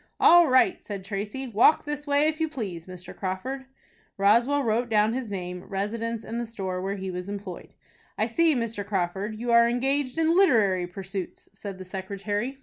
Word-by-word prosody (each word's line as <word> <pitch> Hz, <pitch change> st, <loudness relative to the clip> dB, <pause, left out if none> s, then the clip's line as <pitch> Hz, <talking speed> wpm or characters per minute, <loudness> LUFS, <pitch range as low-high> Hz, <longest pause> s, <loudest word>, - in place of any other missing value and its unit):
"All 345 Hz, -1 st, +7 dB
right," 255 Hz, -1 st, +3 dB
said 200 Hz, -3 st, -7 dB
Tracy; 210 Hz, +7 st, -4 dB
"walk 240 Hz, +7 st, +4 dB
this 295 Hz, 0 st, -5 dB
way 285 Hz, +1 st, +3 dB
if 310 Hz, 0 st, -1 dB
you 320 Hz, -, +1 dB
please, 195 Hz, -, -6 dB
Mr. 180 Hz, -1 st, -9 dB
Crawford." 230 Hz, +9 st, -4 dB, 0.5 s
Roswell 235 Hz, +8 st, +3 dB
wrote 235 Hz, +1 st, 0 dB
down 215 Hz, 0 st, +3 dB
his 250 Hz, -3 st, -3 dB
name, 180 Hz, -2 st, -5 dB
residence, 225 Hz, +3 st, -3 dB
and 235 Hz, +1 st, -4 dB
the -, -, -3 dB
store 190 Hz, -5 st, -4 dB
where 195 Hz, +1 st, -2 dB
he 190 Hz, -1 st, -5 dB
was 180 Hz, +1 st, -5 dB
employed. 200 Hz, -3 st, -7 dB, 0.4 s
"I -, -, +2 dB
see, 335 Hz, -3 st, +2 dB
Mr. 230 Hz, -4 st, -2 dB
Crawford, 195 Hz, +2 st, -2 dB
you 235 Hz, +2 st, -3 dB
are 235 Hz, 0 st, +6 dB
engaged 265 Hz, +3 st, 0 dB
in 325 Hz, +1 st, +3 dB
literary 210 Hz, -, +4 dB
pursuits," 190 Hz, 0 st, -7 dB
said 200 Hz, -1 st, -7 dB
the 185 Hz, -, -9 dB
secretary. 205 Hz, +6 st, -4 dB
215 Hz, 180 wpm, -26 LUFS, 195-260 Hz, 0.5 s, All